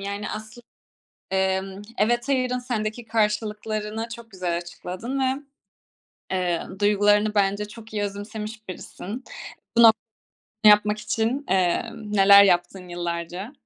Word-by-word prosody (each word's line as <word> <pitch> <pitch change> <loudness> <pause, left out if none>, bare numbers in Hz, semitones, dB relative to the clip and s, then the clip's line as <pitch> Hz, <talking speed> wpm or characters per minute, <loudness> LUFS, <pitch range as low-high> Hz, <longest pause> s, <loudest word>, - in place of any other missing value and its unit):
yani, 200 +1 -4
aslında, 215 +2 -8 0.6
emm, 190 +1 -1 0.2
evet, 240 +5 +1
hayırın 255 -2 +1
sendeki 235 -2 -3
karşılıklarını 215 0 -1
çok 230 -1 -14
güzel 180 -3 -2
açıkladın 180 +9 -5
ve, 265 +2 0 0.9
eee, 180 -2 0 0.2
duygularını 205 +1 +3
bence 200 +1 +2
çok 220 0 -13
iyi 205 -1 -1
özümsemiş 215 +2 -6
birisin. 210 +6 -7 1.4
Bu - - +9
no - - +11
yapmak 210 0 +4
için, 230 +6 -1
emm, 210 +4 0
neler 200 0 +8
yaptın 180 0 +1
yıllarca? 175 - -4
210 Hz, 115 wpm, -24 LUFS, 190-225 Hz, 1.4 s, no